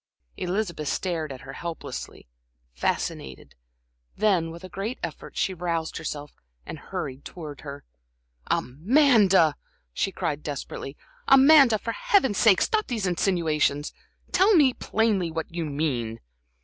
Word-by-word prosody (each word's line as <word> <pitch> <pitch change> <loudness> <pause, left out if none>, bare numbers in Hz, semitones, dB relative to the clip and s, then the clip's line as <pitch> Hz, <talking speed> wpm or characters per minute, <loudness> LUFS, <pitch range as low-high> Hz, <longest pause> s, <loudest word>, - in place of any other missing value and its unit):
Elizabeth 180 -4 -3
stared 165 -4 -2
at 130 - -8
her 135 - -9
helplessly, 170 - -7 0.5
fascinated; 65 +1 -3 0.6
then, 190 -6 +2
with 170 +2 -10
a - - -7
great 200 +6 -4
effort, 165 -3 -7
she 190 - 0
roused 170 -2 -3
herself 150 -2 -6 0.3
and - - -7
hurried 130 +1 -6
towards 150 -5 -9
her. 140 -1 -8 0.6
"Amanda!" 195 - +4 0.4
she - - -1
cried, 145 0 -3
desperately. 140 -1 -6 0.3
"Amanda, 270 -3 +7
for 230 - -4
Heaven's 395 - +2
sake, 210 -5 +5
stop 435 -1 0
these 225 -6 -2
insinuations! 160 -5 0 0.4
Tell 400 +2 +5
me 280 -6 +5
plainly 210 -8 0
what 160 +1 -5
you 170 -1 -2
mean?" 140 -7 -2
170 Hz, 125 wpm, -25 LUFS, 150-220 Hz, 0.6 s, Amanda